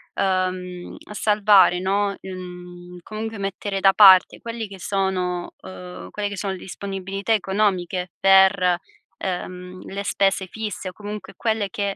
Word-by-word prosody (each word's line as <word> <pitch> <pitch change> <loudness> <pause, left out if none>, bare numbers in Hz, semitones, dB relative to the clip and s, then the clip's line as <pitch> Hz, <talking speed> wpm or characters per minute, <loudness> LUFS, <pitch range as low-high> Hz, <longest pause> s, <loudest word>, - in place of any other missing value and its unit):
uhm, 185 -1 -2
salvare, 205 -4 +4
no 200 +1 0
mhmm, 180 -1 -9
comunque, 220 +2 -6
mettere 195 0 -3
da 195 0 +5
parte 190 -3 +7
quelli 230 -1 -5
che 195 -1 -11
sono 185 -2 -1
uhm, 90 -1 -9
quelle 205 -1 -3
che 205 - -7
sono 195 0 -2
le 185 - -8
disponibilità 195 +2 -5
economiche 185 -3 0
per, 190 -2 +5 0.5
uhm, 180 0 -5
le 200 +1 -5
spese 195 -1 +1
fisse, 210 -1 -5
o - - -12
comunque, 210 +1 -8
quelle 220 -3 -1
che, 200 +1 -2
190 Hz, 135 wpm, -23 LUFS, 180-200 Hz, 0.5 s, parte